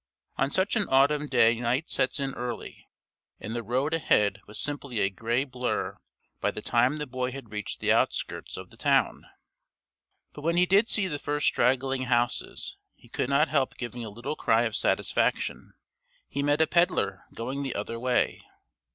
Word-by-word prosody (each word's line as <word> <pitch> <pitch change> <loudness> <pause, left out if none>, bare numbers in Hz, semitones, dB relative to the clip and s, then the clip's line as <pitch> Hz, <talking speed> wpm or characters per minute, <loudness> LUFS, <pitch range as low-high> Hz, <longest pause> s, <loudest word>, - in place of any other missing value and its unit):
On 135 - +1
such 185 +9 +1
an 210 -3 +1
autumn 145 +3 +3
day 115 -4 +5
night 125 +7 0
sets 130 - +1
in 135 -1 -2
early, 120 -2 -6 0.5
and 110 +3 -5
the 120 - -1
road 130 +7 -1
ahead 105 -11 +2
was 105 - -7
simply 140 -5 -3
a 95 - +2
gray 115 +6 0
blur 125 -2 -3 0.4
by - - +1
the - - -5
time 125 +5 +2
the 150 - -3
boy 130 -1 -3
had 130 -5 -9
reached 105 -1 -4
the - - +1
outskirts - - 0
of - - -9
the - - -16
town. - - +1 1.1
But 145 - -9
when 165 +3 +1
he 180 - +5
did 200 +5 +4
see 210 - +3
the 150 -6 -3
first 145 +1 -1
straggling 130 +1 +2
houses 120 -1 -1 0.2
he - - -20
could 125 - -2
not 145 +3 +3
help 140 -4 0
giving 120 -1 -5
a 110 - -5
little 120 +8 -5
cry 115 -5 +2
of 115 -2 -1
satisfaction. - - 0 0.5
He 140 - -3
met 145 +2 +2
a - - +6
pedlar 175 +2 +1
going 130 +5 -3
the 135 -2 -3
other 115 +3 -4
way. 125 0 +1
130 Hz, 180 wpm, -27 LUFS, 120-145 Hz, 1.1 s, a